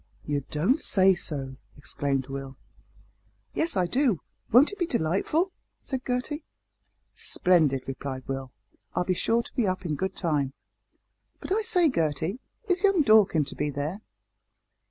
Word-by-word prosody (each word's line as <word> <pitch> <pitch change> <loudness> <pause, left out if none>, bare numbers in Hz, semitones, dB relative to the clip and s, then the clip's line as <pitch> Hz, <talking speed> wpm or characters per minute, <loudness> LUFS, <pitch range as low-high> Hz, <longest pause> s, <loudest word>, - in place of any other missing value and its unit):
"You 145 -2 -1
don't 185 - +2
say 190 -7 +4
so!" 135 -6 -4 0.2
exclaimed 140 -2 -1
Will. 135 0 -7 1.0
"Yes, 320 - 0
I 180 - +3
do; 245 - +1 0.3
won't 260 - +6
it 410 - -9
be 350 - +1
delightful?" 240 - 0 0.3
said 265 -2 -4
Gertie. 255 +5 -2 0.7
"Splendid," 155 -8 +3
replied 135 0 -5
Will, 135 -1 -4 0.4
"I'll - - +2
be 185 - 0
sure 230 +6 +1
to - - -11
be 240 -6 +1
up 185 0 -2
in 160 - -1
good 190 +6 -2
time. 145 -6 0 0.9
But, - - -8
I 425 +3 +2
say, 370 -7 +3
Gertie, 165 - -1 0.3
is 365 -2 +2
young 390 -6 +4
Dorkin 210 - +5
to 140 - -7
be 150 - -1
there?" 145 +8 -4
180 Hz, 150 wpm, -27 LUFS, -, 1.0 s, won't